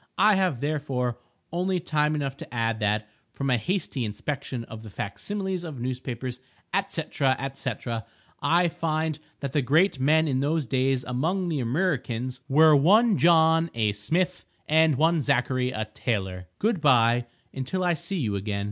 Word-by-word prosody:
I 215 0 +5
have, 185 -10 +1
therefore, 140 -5 -2 0.3
only 180 +2 0
time 155 -2 0
enough 140 -2 -2
to - - -10
add 115 -2 -1
that, 105 0 0 0.2
from 135 -1 -2
a 125 - +4
hasty 170 - -2
inspection 125 +3 -4
of 110 -1 -10
the 110 - -10
fac 100 0 -6
similes 190 -3 -3
of 155 -7 -7
newspapers, 125 0 -4 0.5
&c., 165 - -3
&c., 135 -1 -1 0.7
I 175 +1 +3
find 160 -2 -2 0.2
that 140 -2 -3
the 145 - +1
great 150 +5 +3
men 155 +4 +3
in 130 -3 0
those 150 +2 0
days 130 +1 +1
among 170 +9 -1
the 155 -4 -1
Amriccans, 125 -3 -1
were 155 +2 +6
one 205 +10 +5
John, 165 0 +5
a 110 -2 +1
smith, 170 - -1 0.2
and 160 -1 +4
one 160 +4 +3
Zacchary, 130 -1 +1
a 110 -3 -3
tailor. 95 -5 -3
Good 210 -5 0
bye, 120 -4 +4 0.3
until 135 +8 -3
I 175 -1 +3
see 190 +5 -4
you 110 - -1
again. 100 +1 -2
140 Hz, 160 wpm, -26 LUFS, 125-165 Hz, 0.7 s, were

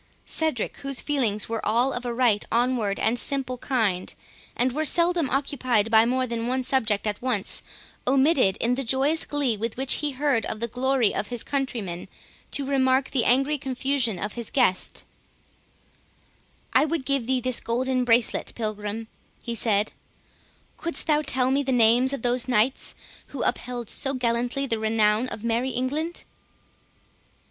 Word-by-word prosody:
Cedric, 315 -9 -2
whose 275 -2 -2
feelings 235 -8 0
were 225 -1 -3
all 240 +5 +2
of 245 0 -4
a - - -1
right 235 -4 +2
onward 235 -4 +1
and 230 +2 +1
simple 260 -3 0
kind, 215 -10 0 0.4
and 255 +1 +1
were 305 +5 -1
seldom 340 -1 +2
occupied 255 -5 0
by 220 0 +6
more 255 +2 +1
than 235 -1 -3
one 255 +1 0
object 220 -6 +1
at 210 -1 -2
once, 245 -6 -1 0.5
omitted, 265 - +3
in 240 +2 +1
the 270 +2 -2
joyous 270 +6 +1
glee 285 -6 0
with 225 +2 -4
which 265 0 +4
he 295 -2 -2
heard 270 -3 +1
of 215 - -4
the 235 - -1
glory 250 -1 +1
of 205 - -2
his 240 -1 -3
countrymen, 230 -11 -3 0.4
to 280 - -2
remark 265 -1 +2
the 255 -4 +1
angry 275 +4 +2
confusion 260 -4 0
of 210 +4 -4
his 235 -2 -6
guest; 245 -9 +1 1.7
"I - - +5
would 310 -3 -2
give 275 -4 0
thee 260 0 +2
this 255 0 +1
golden 255 +2 0
bracelet, 235 -1 +1
Pilgrim," 215 0 -4 0.4
he 235 - -3
said, 215 -2 +1 0.9
"couldst 335 0 -4
thou 300 -1 +3
tell 260 -3 +1
me 275 +1 +2
the 270 -1 -2
names 245 +2 +4
of 275 -4 -4
those 245 +1 +1
knights 245 +2 +1 0.3
who 280 - -5
upheld 245 -2 -2
so 270 +5 -1
gallantly 245 +2 0
the 230 -4 -2
renown 220 +1 +2
of 215 - -8
merry 235 +3 0
England." 285 +7 -2
250 Hz, 160 wpm, -25 LUFS, 225-270 Hz, 1.7 s, by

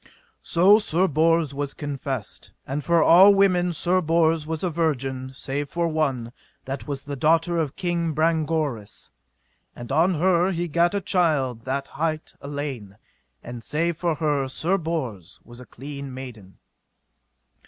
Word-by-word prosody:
So 195 +5 +5
Sir 190 -3 +2
Bors 160 -1 +2
was 140 0 -4
confessed, 135 -6 -5 0.2
and 140 +2 -4
for 170 0 +3
all 190 +4 +7
women 180 -3 +3
Sir 175 +3 +1
Bors 165 -1 +1
was 160 +1 -4
a 180 - +1
virgin, 135 -5 -2
save 140 +2 -4
for 170 0 -1
one, 135 -7 -1 0.3
that 130 -3 -6
was 140 -2 -5
the 145 0 -5
daughter 165 +5 +2
of 150 -4 -2
King 170 -3 -1
Brangoris, 155 -8 -1 0.6
and 120 +1 -8
on 170 +6 +3
her 175 +2 +2
he 175 +1 -2
gat 170 +4 +1
a 200 - 0
child 145 - 0
that 135 +1 -2
hight 155 +1 -3
Elaine, 140 -8 -6 0.5
and 120 -1 -8
save 170 +3 -1
for 170 0 -1
her 145 -3 0
Sir 175 +8 0
Bors 120 - -5
was 120 +1 -13
a 125 - -13
clean 140 +1 -8
maiden. 120 -7 -10
155 Hz, 150 wpm, -24 LUFS, 135-170 Hz, 0.6 s, all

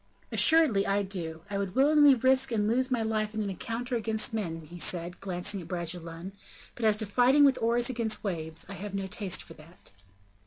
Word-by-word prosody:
"Assuredly 310 -12 +4
I 200 +1 +1
do; 170 -4 -6
I 200 0 -3
would 195 -2 -4
willingly 290 +1 +6
risk 260 +1 +2
and 210 -2 0
lose 255 +4 +1
my 240 -3 0
life 215 -1 -2
in 215 - -1
an 200 - -3
encounter 235 +6 -4
against 220 -1 -1
men," 170 -7 -3
he 170 +3 -11
said, 175 +1 -2
glancing 185 +1 -2
at 165 - -11
Bragelonne, 170 0 -5 0.4
"but 235 - -4
as 215 -1 +4
to 215 - -1
fighting 250 +7 +4
with 275 -2 +4
oars 235 +1 +2
against 230 -3 -1
waves, 160 -5 -2
I 195 - -8
have 200 +2 -7
no 195 0 -2
taste 190 -1 -2
for 165 - -13
that." 165 +3 -16
205 Hz, 200 wpm, -28 LUFS, 180-240 Hz, 0.4 s, willingly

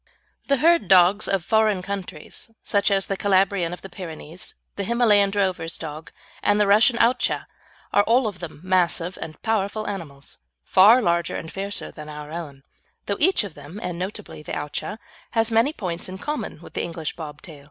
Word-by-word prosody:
The 280 - +3
herd 325 - +4
dogs 190 +2 +5
of 190 -3 0
foreign 215 -3 +2
countries, 185 -2 -5
such 200 -1 +2
as 195 -1 +2
the 195 - -2
Calabrian 190 -3 +2
of 180 - -8
the - - -6
Pyrenees, 170 -1 -7 0.2
the 200 - -3
Himalayan 215 -3 +4
drover's 185 -5 -1
dog, 155 0 -7 0.3
and 205 - +3
the 210 - +5
Russian 220 +5 +5
Owtchah, 240 +3 +2 0.5
are 205 - +6
all 240 +3 +3
of 205 -4 -3
them 165 -3 -8
massive 180 -1 +1
and 155 -2 -7
powerful 215 -1 -1
animals, 155 -9 -7 0.2
far 220 - +6
larger 170 -3 +1
and 160 - -6
fiercer 200 +1 -4
than 150 -1 -10
our 150 0 -8
own, 150 -5 -7 0.4
though 200 - -1
each 370 - +3
of 200 -5 -7
them, 170 +8 -10
and 175 -1 -4
notably 195 -2 -6
the - - -7
Owtchah, 150 +8 -4 0.4
has 225 +1 +2
many 230 +6 +4
points 180 - -4
in 185 - -6
common 295 - -4
with - - -12
the - - -1
English 165 -2 -4
bob 150 -3 -8
tail. 155 -5 -11
190 Hz, 185 wpm, -23 LUFS, 165-210 Hz, 0.5 s, are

